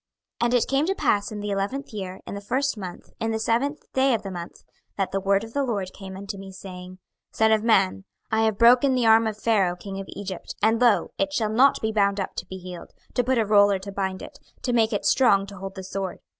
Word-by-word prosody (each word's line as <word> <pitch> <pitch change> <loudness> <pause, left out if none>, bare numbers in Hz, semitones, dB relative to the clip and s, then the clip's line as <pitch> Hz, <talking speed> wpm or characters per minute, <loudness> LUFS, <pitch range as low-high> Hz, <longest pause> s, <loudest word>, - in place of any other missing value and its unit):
26:030:020 - - +3
And 240 - -1
it 245 - +2
came 275 +2 +1
to 385 - 0
pass 205 - +1
in 210 - -5
the 205 - -4
eleventh 205 +9 -2
year, 190 -3 -6
in - - -7
the 200 - -5
first 265 +6 0
month, 185 -4 -8
in 225 -1 -1
the 220 - 0
seventh 240 +7 0
day 265 -1 +3
of 215 - -4
the 195 - -5
month, 175 -2 -8 0.3
that 195 -2 -1
the 195 - 0
word 195 +1 +2
of 225 0 -10
the 280 - +1
LORD 200 -7 -2
came 190 -1 -9
unto 200 0 -6
me, 195 0 -9
saying, 185 -1 -10 0.4
26:030:021 - - -21
Son 220 0 +4
of 220 -1 +3
man, 95 - +2 0.3
I 220 0 +2
have 220 -2 0
broken 250 +3 +5
the 250 -2 +1
arm 225 0 +6
of 215 -1 -3
Pharaoh 205 -5 +2
king 195 +2 -7
of 195 - -7
Egypt; 195 -3 -6
and, 225 +2 +2
lo, 240 -3 +3
it 295 0 +1
shall 220 -6 0
not 260 +5 +4
be 220 - +1
bound 200 -2 +2
up 190 - -3
to - - -4
be 190 - -7
healed, 180 -2 -9 0.2
to 245 - +1
put 255 +1 +1
a 225 - +2
roller 205 -1 +5
to 195 +1 -8
bind 190 -1 -3
it, - - -11 0.2
to 245 - 0
make 225 -1 +3
it 205 - -2
strong 200 -7 +4
to 200 0 -11
hold 195 0 -7
the 190 - -7
sword. 190 0 -4
205 Hz, 260 wpm, -25 LUFS, 195-230 Hz, 0.4 s, arm